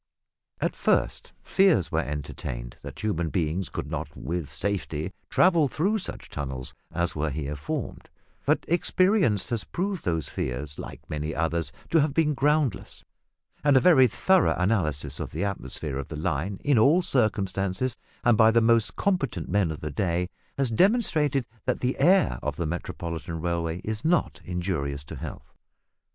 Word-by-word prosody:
At - - -1
first - - 0
fears 190 - +3
were - - +1
entertained - - -5
that - - -8
human 85 -6 0
beings 85 +2 -1
could - - -4
not - - -5
with 85 -4 -4
safety 90 0 -2 0.2
travel 170 -5 +4
through 195 +11 0
such 185 - -5
tunnels 65 -3 -5 0.2
as 85 0 -1
were 80 0 0
here 75 0 -3
formed, 70 0 -5 0.3
but - - +1
experience 175 - +2
has 115 -3 0
proved 190 0 -3
those 80 -5 -1
fears, 70 +4 -4
like - - -9
many 75 +1 -3
others, 80 -2 -1 0.2
to 160 - +5
have 145 -1 0
been 155 -2 +3
groundless, 145 0 0 0.6
and 145 -2 +5
a - - +7
very 135 -6 +6
thorough 190 - +3
analysis 75 -8 0
of - - -4
the - - -2
atmosphere 80 -7 -3
of 70 - -5
the - - -7
line 90 +4 -2
in 140 -5 +4
all 155 +11 +5
circumstances, 105 - 0 0.3
and 120 -3 +4
by 110 0 +7
the 115 +1 +4
most 115 -1 +3
competent 135 - -1
men 100 -2 +2
of 80 - -5
the 75 - -4
day, 90 +3 0 0.3
has 135 -4 +1
demonstrated 150 - +3 0.2
that - - 0
the 125 +1 -1
air 175 - +4
of - - -2
the 85 - -2
Metropolitan 85 0 -4
railway 85 0 -2
is 110 0 -4
not 170 +2 +1
injurious 85 -6 -2
to 75 - -9
health. 75 +3 -8
95 Hz, 160 wpm, -26 LUFS, -, 0.6 s, a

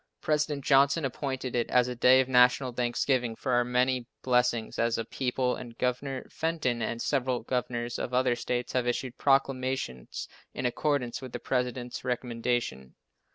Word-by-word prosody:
President 150 -2 0
Johnson 140 +2 +4
appointed 130 -1 -3
it 120 -1 0
as 125 -1 +4
a 125 - -3
day 125 +2 +6
of 130 - -2
national 125 0 +4
thanksgiving 120 0 0
for 130 - -3
our 120 0 +4
many 125 0 +1 0.2
blessings 125 -2 +1
as 115 0 +2
a 115 - -2
people, 125 +1 -1
and 120 -2 -9
Governor 130 +1 -2
Fenton 155 -7 -1
and 115 +1 -2
several 130 -2 0
governors 120 -1 -2
of - - -3
other 125 -1 +2
states 120 +1 -3
have 125 -1 +1
issued 125 +1 -2
proclamations 130 - 0 0.3
in 125 - -3
accordance 125 -1 0
with 130 -2 -8
the 120 - -3
President's 125 0 -2
recommendation. 120 - -2
125 Hz, 155 wpm, -29 LUFS, 120-130 Hz, 0.3 s, day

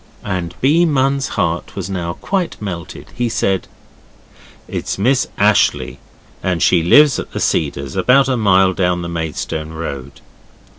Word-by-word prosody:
And 90 -3 -3
B. 155 +6 +4
Munn's 135 -3 +1
heart 85 +1 -1
was 95 -3 -4
now 90 -3 -3
quite 190 - -3
melted, 90 -5 -7
he 120 -1 -1
said 95 -4 -1 1.0
'It's - - -4
Miss 125 +6 +2
Ashleigh, 65 +1 +2 0.4
and 90 -3 0
she 90 - +4
lives 145 - +5
at - - -7
The - - -3
Cedars 70 -3 -1
about 125 +8 +4
a 130 - +1
mile 95 -4 +3
down 90 -2 0
the - - -4
Maidstone 80 -1 -4
Road. 70 -4 -7
95 Hz, 145 wpm, -17 LUFS, 85-125 Hz, 1.0 s, lives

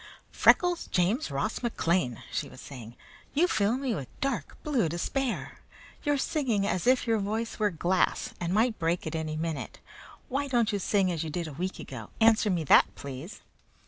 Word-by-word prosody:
"Freckles 355 -1 +4
James 190 - +1
Ross 150 +11 -2
McLean!" 170 - 0
she - - -2
was - - -13
saying. 120 -4 -10 0.4
"You 340 +5 +4
fill 215 - +1
me 265 -3 -1
with 140 - -4
dark 245 - -2
blue 255 - +1
despair! 240 - -2 0.4
You're 290 -1 +1
singing 255 -8 0
as 185 +1 -1
if 255 0 +4
your 225 -2 +2
voice 220 +4 -3
were 210 -1 +3
glass 180 +1 0
and 175 0 -2
might 220 +3 +2
break 170 +1 0
at 160 - -4
any 155 -1 -3
minute. 160 -2 -4 0.5
Why 280 +2 -1
don't 240 -4 +2
you 205 - 0
sing 195 -1 +2
as 165 -2 -2
you 160 - -4
did 170 +2 -3
a 155 - -7
week 185 +6 -3
ago? 115 -5 -8
Answer 220 -1 +5
me 175 -4 +1
that, 145 - +5
please." 140 +7 -8
195 Hz, 180 wpm, -28 LUFS, 165-240 Hz, 0.5 s, Answer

